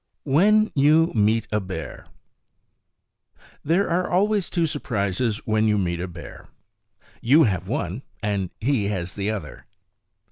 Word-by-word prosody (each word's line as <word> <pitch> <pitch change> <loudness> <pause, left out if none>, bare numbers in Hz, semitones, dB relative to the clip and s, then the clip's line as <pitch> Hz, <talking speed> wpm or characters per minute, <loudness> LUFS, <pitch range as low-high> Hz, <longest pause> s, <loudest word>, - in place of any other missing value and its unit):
When 210 +10 +3
You 155 +4 +4
Meet 110 +1 +2
a 105 - +1
Bear 95 -5 -7 1.6
There 175 +7 +1
are 180 +2 0
always 200 +1 +1
two 170 -2 0
surprises 110 - -2
when 110 0 +1
you 105 -1 +2
meet 85 -3 -1
a 90 - -3
bear. 85 -4 -11 0.7
You 145 +7 +5
have 95 -6 -1
one, 90 +8 -3 0.2
and 100 -3 -1
he 120 -3 0
has 95 -3 -3
the 100 +1 -3
other. 110 -2 -6
110 Hz, 135 wpm, -23 LUFS, 100-160 Hz, 1.6 s, You